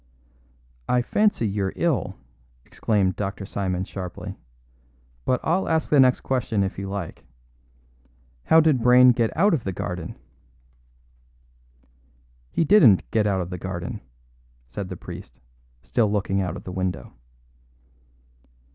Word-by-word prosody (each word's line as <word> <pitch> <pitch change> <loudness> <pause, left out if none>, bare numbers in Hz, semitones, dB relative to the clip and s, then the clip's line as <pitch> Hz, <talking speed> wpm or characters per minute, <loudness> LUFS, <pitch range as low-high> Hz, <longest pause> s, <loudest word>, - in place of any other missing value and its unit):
"I 125 -1 +2
fancy 205 - +1
you're 100 -1 -2
ill," 140 - 0 0.5
exclaimed 100 -4 0
Dr. 100 0 -4
Simon 95 -2 -2
sharply; 95 -2 -7 0.9
"but 125 - +1
I'll 180 +4 0
ask 160 -1 0
the 145 - +5
next 130 -1 +5
question 115 -6 0
if 95 0 -4
you 100 0 -5
like. 100 -4 -6 1.2
How 160 0 +6
did 150 -6 +2
Brayne 125 +1 +7
get 115 -2 +1
out 200 +4 +4
of 140 -8 0
the 95 - -2
garden?" 90 -1 -5 2.3
"He - - 0
didn't 150 - +5
get 110 -1 +2
out 95 -2 +1
of 90 +1 -6
the 90 - -5
garden," 95 -2 -5 0.6
said - - -6
the - - -6
priest, - - -10 0.4
still 110 - +1
looking 100 -1 0
out 90 - -3
of - - -11
the 90 - -7
window. 90 -8 -3
100 Hz, 130 wpm, -24 LUFS, 95-125 Hz, 2.3 s, Brayne